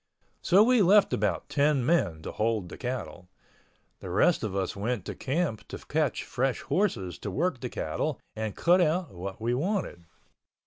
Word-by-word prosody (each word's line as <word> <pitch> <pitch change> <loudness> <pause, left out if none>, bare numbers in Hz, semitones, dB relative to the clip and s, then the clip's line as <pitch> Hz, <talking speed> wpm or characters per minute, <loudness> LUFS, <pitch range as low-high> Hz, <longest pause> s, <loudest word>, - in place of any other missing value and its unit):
So 195 +4 +5
we 245 0 +4
left 200 +2 +5
about - - 0
ten 145 -3 +2
men 85 - +1
to - - -5
hold 110 -4 -1
the - - -9
cattle. 125 -8 -5 0.7
The - - -8
rest - - +3
of 100 -3 -3
us 95 -1 -2
went 105 0 -2
to - - -4
camp 140 -5 -2
to - - -7
catch 150 -4 -1
fresh 125 0 -1
horses 95 - -1
to 105 - -5
work 150 - -1
the 125 0 -4
cattle 80 - -3 0.2
and 110 -2 -4
cut 180 +2 +4
out 170 -1 +1
what 95 +2 -6
we 115 +2 0
wanted. 145 - -2
125 Hz, 175 wpm, -28 LUFS, -, 0.7 s, So